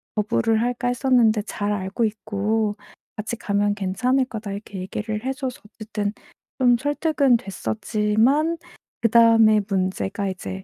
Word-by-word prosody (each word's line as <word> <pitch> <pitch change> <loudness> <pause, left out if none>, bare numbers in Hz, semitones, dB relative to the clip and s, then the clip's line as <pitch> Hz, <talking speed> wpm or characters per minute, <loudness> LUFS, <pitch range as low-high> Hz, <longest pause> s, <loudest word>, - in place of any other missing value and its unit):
거부를 220 +1 +1
할까 245 +1 -1
했었는데 245 -4 +3
"잘 205 -1 -3
알고 200 +3 -2
있고 215 0 -1 0.4
같이 215 +2 -4
가면 205 -1 0
괜찮을 250 +7 +1
거다." 220 -5 -6
이렇게 200 0 -8
얘기를 215 +4 -4
해 265 - 0
줘서 260 -2 -5
어쨌든 210 -1 -4 0.5
좀 245 -2 +5
설득은 290 -1 +2
됐었지만 220 - 0 0.4
그다음에 225 -1 +6
문제가 190 +1 -1
이제 190 0 -6
220 Hz, 295 characters per minute, -23 LUFS, 205-245 Hz, 0.5 s, 그다음에